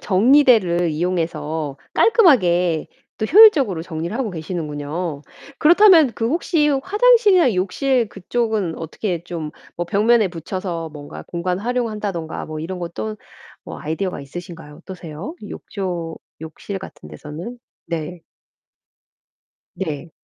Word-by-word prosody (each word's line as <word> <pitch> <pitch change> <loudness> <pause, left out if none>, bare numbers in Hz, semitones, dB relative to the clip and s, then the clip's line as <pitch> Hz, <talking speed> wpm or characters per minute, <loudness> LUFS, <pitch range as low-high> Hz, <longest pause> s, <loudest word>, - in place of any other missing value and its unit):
정리대를 200 - +4
이용해서 160 -3 -2 0.2
깔끔하게 180 - +4 0.3
또 220 - -1
효율적으로 280 - +6
정리를 170 +3 -5
하고 250 -5 -2
계시는군요. 155 -2 -4 0.4
그렇다면 335 - +6
그 225 0 -1
혹시 315 0 +1
화장실이나 400 - +4
욕실 235 +6 0
그쪽은 210 -3 -2
어떻게 170 +2 -4
좀 165 -4 -5 0.3
뭐 175 - -2
벽면에 215 +3 +3
붙여서 170 0 -5
뭔가 145 - -9
공간 180 +1 -2
활용한다든가 210 -7 -3
뭐 155 0 -6
이런 180 +3 -5
것 170 -1 -6
또 215 -1 -4 0.5
뭐 - - -8
아이디어가 160 +3 -3
있으신가요? 165 +1 -9
어떠세요? 180 - -8
욕조 175 -5 -5 0.2
욕실 175 +5 -7
같은 75 - -11
데서는? 155 - -8 0.3
네. 170 +1 -4 1.6
네. 160 -3 -5
180 Hz, 290 characters per minute, -20 LUFS, 160-235 Hz, 1.6 s, 효율적으로